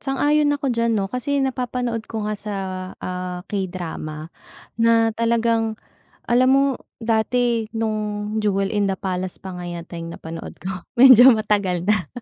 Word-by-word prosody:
Sang-ayon 290 +2 +2
ako 275 -3 -1
diyan 230 -1 +1
'no 195 - 0
kasi 280 +3 -1
napapanood 245 -3 -2
ko 220 -2 -4
nga 215 0 -1
sa, 205 0 -5 0.5
ah, 180 -1 -4
K-drama 170 -5 -5 0.5
na 230 -1 +4
talagang, 230 -1 +1 0.5
alam 250 +2 +4
mo 275 0 +5 0.4
dati 230 0 +1
nung 215 -1 -2
Jewel 195 -2 +1
in 205 -1 +1
the 195 - -1
Palace 185 -1 -3
pa 190 -2 -7
nga 175 - -6
yata 170 0 -7
'yung 165 0 -6
napanood 165 0 -8
ko, 185 -1 -5 0.2
medyo 255 0 +10
matagal 205 -5 0
na. 190 -7 +2
215 Hz, 145 wpm, -22 LUFS, 185-235 Hz, 0.5 s, medyo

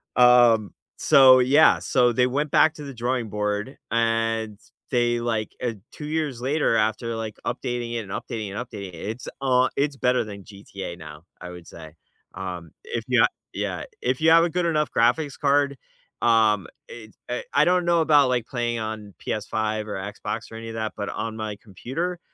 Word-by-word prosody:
Um, 120 -3 +5 0.2
so, 130 -1 +7
yeah, 140 +5 +5
so 125 -2 +2
they 125 +2 +2
went 145 +4 -1
back 160 0 +5
to 150 - -9
the 140 -1 -7
drawing 120 -1 -2
board, 105 +4 -3
and 115 -2 0 0.3
they, 120 -2 +1
like, 115 -2 -2
uh 120 -2 0 0.2
2 150 - -9
years 150 -5 -2
later 140 -1 +1
after, 110 +2 0
like, 110 -2 -5
updating 120 -1 -3
it 120 - -1
and 100 -4 -8
updating 105 0 -5
and 100 - -6
updating 100 -4 -8
it - - -9
it's 110 +8 -6
a 130 -1 +3
it's 140 0 0
better 125 -2 +1
than 100 -2 -9
GTA 100 -3 -9
now, 75 -1 -11 0.2
I 90 - -8
would 90 -1 -11
say. 80 -2 -11 0.4
Um, 90 -4 -6
if - - -4
you - - +4
a - - +6 0.3
Yeah, - - -3 0.2
if 125 +2 -1
you 160 +1 +5
have 165 0 +7
a 170 - +1
good 175 +1 -1
enough 150 -2 +1
graphics 125 +5 +1
card, 140 -1 +2 0.5
um, 110 -5 +3 0.2
it's, 110 -2 -12
eh 125 - -3
I 145 - +5
don't 180 0 +2
know 170 -1 +3
about, 145 -4 +4
like, 120 -3 0
playing 120 -2 -2
on 110 -2 -6
Ps5 110 0 -2
or 105 - -4 0.2
Xbox 115 +2 -6
or - - -9
any 115 0 -7
of 115 - -7
that, 110 -1 -3
but 100 - -3
on 115 -1 -4
my 110 -2 -4
computer, 145 - -4
120 Hz, 190 wpm, -24 LUFS, 110-135 Hz, 0.5 s, so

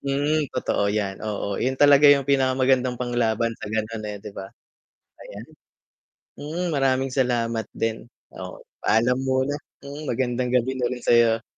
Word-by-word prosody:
Mm, 145 +2 0
totoo 100 -5 -1
'yan, 100 -2 -2
oo. 100 -2 -3
Yun 130 +1 0
talaga 145 0 +7
yung 140 -1 +4
pinakamagandang 130 -2 +2
panglaban 115 -2 0
sa - - -6
ganun, 110 0 -3
eh, 105 - -5
'di 105 - -9
ba, 95 0 -7 0.8
ayan. 105 +3 -10 1.0
Mm 165 +5 -3
maraming 135 -1 +1
salamat 115 -4 0
din. 115 +1 -3 0.3
Oo, - - -8 0.2
Paalam 125 +3 +2
muna. 130 +1 0 0.3
Mm, 145 +1 -7
magandang 125 0 -1
gabi 125 +1 +1
na 125 -2 -1
rin 125 0 -5
sa'yo. 115 -1 +4
125 Hz, 145 wpm, -23 LUFS, 115-135 Hz, 1.0 s, talaga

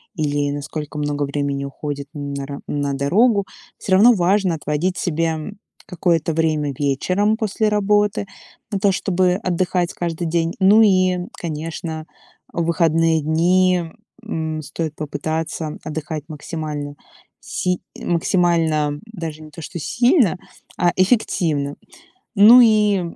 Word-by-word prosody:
или 145 -3 0
насколько 145 +1 -5
много 145 0 -1
времени 140 0 -2
уходит 140 0 -6
на 140 -2 -5
ра 140 -1 -6
на 145 -1 -2
дорогу, 200 - +2 0.3
всё 190 - -2
равно 220 +6 +7
важно 190 -2 +2
отводить 155 +4 -2
себе 165 -1 -1 0.5
какое-то 165 -2 0
время 155 -3 0
вечером 185 +10 +1
после 215 -1 0
работы 210 0 +1 0.5
на 200 - -1
то, 200 0 +3
чтобы 185 -1 +1
отдыхать 180 -2 -1
каждый 170 -1 -3
день. 165 0 0
Ну 205 +4 +6
и, 185 -3 +3 0.2
конечно, 160 0 -5 0.5
в 170 - -1
выходные 165 -1 +2
дни, 180 +3 +2 0.4
м, 160 -7 -3
стоит 155 +2 -5
попытаться 155 +1 -4
отдыхать 155 -1 -5
максимально, 150 -2 -5 0.5
си 180 -1 -2 0.2
максимально 165 -4 +1
даже 165 -8 -7
не 155 - -12
то 165 - -10
что 170 - -7
сильно, 240 - +2 0.4
а 175 -1 +3
эффективно. 165 - +1 0.6
Ну 225 +5 +9
и 210 -4 +4
165 Hz, 120 wpm, -20 LUFS, 150-185 Hz, 0.6 s, Ну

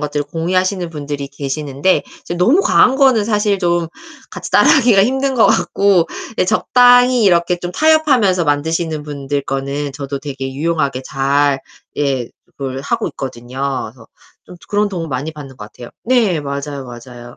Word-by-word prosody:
것들을 145 -1 -2
공유하시는 180 +2 -1
분들이 145 -2 -5
계시는데 140 +4 -1 0.2
이제 175 - -5
너무 245 - +3
과한 265 -8 +4
거는 260 -7 +4
사실 210 -2 0
좀 175 -2 0 0.4
같이 - - -8
따라하기가 235 -9 +5
힘든 265 +3 0
것 230 - +5
같고 195 -4 +2 0.3
예 - - +3
적당히 245 +2 +4
이렇게 175 -1 +2
좀 175 0 -5
타협하면서 270 - +3
만드시는 155 +1 -1
분들 140 -1 -4
거는 140 +1 -4
저도 140 0 -5
되게 135 -1 -6
유용하게 140 -3 -1
잘 140 0 0 0.4
예 135 -4 -1 0.3
그걸 135 -1 -5
하고 - - -2
있거든요. 125 -1 -8 0.3
그래서 125 -3 -17 0.4
좀 - - -13
그런 205 0 +1
도움 170 -4 -5
많이 140 +4 -4
받는 140 -4 -11
것 105 - -9
같아요. 120 - -11
네. 225 -9 +2
맞아요, 140 -1 -5
맞아요. 120 0 -11
155 Hz, 345 characters per minute, -16 LUFS, 140-200 Hz, 0.4 s, 따라하기가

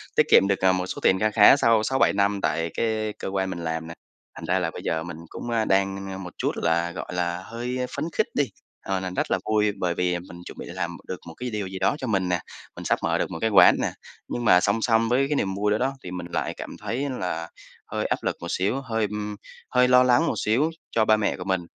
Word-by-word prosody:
tiết - - +6
kiệm 95 - +7
được, 100 -1 +1
à, 95 - +6
một 90 -1 0
số - - -5
tiền 95 - +3
kha 110 0 +2
khá 105 +4 +8
sau 115 -4 +3
6-7 130 +4 +2
năm 100 0 +1
tại 80 +2 0
cái 110 -2 0
cơ - - -4
quan 95 0 -1
mình 90 - -5
làm 80 0 -3
nè, 85 - -7 0.4
thành - - -8
ra 95 +1 +1
là 85 -3 -1
bây - - -8
giờ 80 0 -1
mình 85 -1 -7
cũng, 120 - -7
a, 115 -2 +1
đang 95 0 0
một 90 -3 -8
chút - - 0
là, 85 +1 0
gọi 90 - -7
là, 90 0 -1
hơi, 120 +2 -4
a, 125 - 0
phấn - - -2
khích - - +1
đi, 145 - +2 0.4
ờ, 95 -1 0
nền 95 -1 -5
rất - - -1
là - - +3
vui 105 -1 +2
bởi 90 -2 0
vì, 90 0 +1
à, - - -2
mình 85 0 -10
chuẩn - - -9
bị - - -7
làm 85 0 -4
được 95 - -5
một 80 - -8
cái 125 0 -4
điều 105 -4 -3
gì 95 0 -6
đó 95 +8 +2
cho 130 - -5
mình 95 -4 0
nè, 90 -1 +1 0.4
mình - - -8
sắp - - +1
mở - - +1
được - - -2
một - - -4
cái 110 - +2
quán 100 - +7
nè. - - 0 0.4
Nhưng 120 - -3
mà 90 -4 +7
song 100 +4 +1
song 115 -1 +2
với 130 +3 +2
cái 150 - +1
niềm 95 -6 -1
vui 105 +1 0
đó 105 - +3
đó, 130 +4 0
thì 90 - -7
mình 90 -1 -5
lại - - -1
cảm - - -7
thấy 135 +5 -3
là 85 -2 -3 0.4
hơi - - -1
áp - - -1
lực - - -1
một 85 - -5
xíu, 100 +11 0
hơi, 115 -4 -1
ưm, 105 0 -4 0.3
hơi 125 0 +4
lo 125 0 +6
lắng 125 +6 +4
một - - +1
xíu 125 +9 +2 0.2
cho 110 -1 +2
ba 110 0 +5
mẹ 105 - 0
của 90 - -6
mình. 95 -1 0
100 Hz, 275 wpm, -25 LUFS, 90-115 Hz, 0.4 s, khá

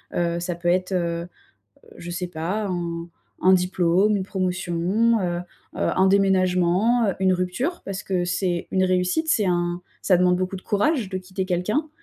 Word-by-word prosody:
Heu, 170 0 0
ça 175 0 -3
peut 175 0 -1
être, 185 +2 +1
heu, 170 -1 -1 0.7
je 175 - -8
sais 180 +1 -3
pas, 180 +6 -3
un 170 -2 -4 0.3
un 185 +1 +6
diplôme, 180 +2 +2
une 195 - -1
promotion, 185 +4 0
heu 175 -1 -1 0.4
heu, - - 0
un 190 - +4
déménagement, 190 +3 +3
heu, 195 - 0
une 190 -1 +3
rupture 185 - -2
parce 195 -1 -5
que 185 -2 -1
c'est 180 -1 -1
une 190 - +2
réussite, 185 - +1
c'est 220 -10 +2
un 175 -1 0 0.2
ça 185 - +4
demande 180 0 +3
beaucoup 185 +1 -2
de 185 - -10
courage 225 - +1
de 190 - -4
quitter 185 +1 -4
quelqu'un, 205 - -1
185 Hz, 175 wpm, -23 LUFS, 175-195 Hz, 0.7 s, un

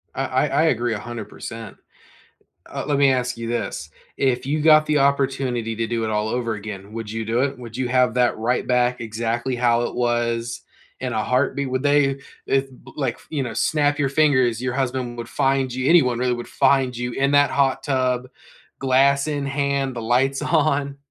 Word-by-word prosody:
I - - -1
I - - +1
I - - +2
agree 120 0 +1
100%. 115 0 -7 0.9
Uh, - - -5
let 145 -1 +1
me 140 -1 +5
ask 125 -1 -2
you 115 0 -5
this, 80 -9 -4 0.3
if 130 -2 +1
you 150 +2 0
got 155 0 +5
the 150 -1 +2
opportunity 135 -5 0
to 115 0 -1
do 115 0 -2
it 110 - -1
all 105 0 0
over 115 -1 -2
again, 100 -1 -8
would 115 -2 -6
you 115 0 -3
do 115 +3 0
it? 140 - -1
Would 115 -1 -9
you 130 -1 -1
have 125 -1 +2
that 125 -1 +2
right 120 +3 0
back 125 -1 +1
exactly 115 +3 -2
how 120 -1 +2
it - - -3
was 120 -1 -1 0.4
in 130 -2 -3
a 110 -1 0
heartbeat? 130 +2 0
Would 130 +2 -2
they 145 -1 +2 0.3
eh 135 0 +3 0.3
like, 130 -5 -2
you 145 -4 -2
know, 120 - -5
snap 145 +4 +1
your 140 -2 +1
fingers, 130 -6 +2
your 130 -1 -2
husband 130 -2 -2
would 120 0 -6
find 135 -1 +1
you, 130 +2 -2
anyone 130 -9 +4
really 125 0 +1
would 120 0 -6
find 135 -3 +2
you 120 0 -3
in 135 +3 0
that 145 0 +4
hot 135 -1 +1
tub, 130 -2 0 0.5
glass 140 +2 +3
in 145 -2 -2
hand, 140 -1 -1
the 115 - -4
lights 130 +4 +1
on? 145 -3 +1
125 Hz, 195 wpm, -22 LUFS, 120-140 Hz, 0.9 s, me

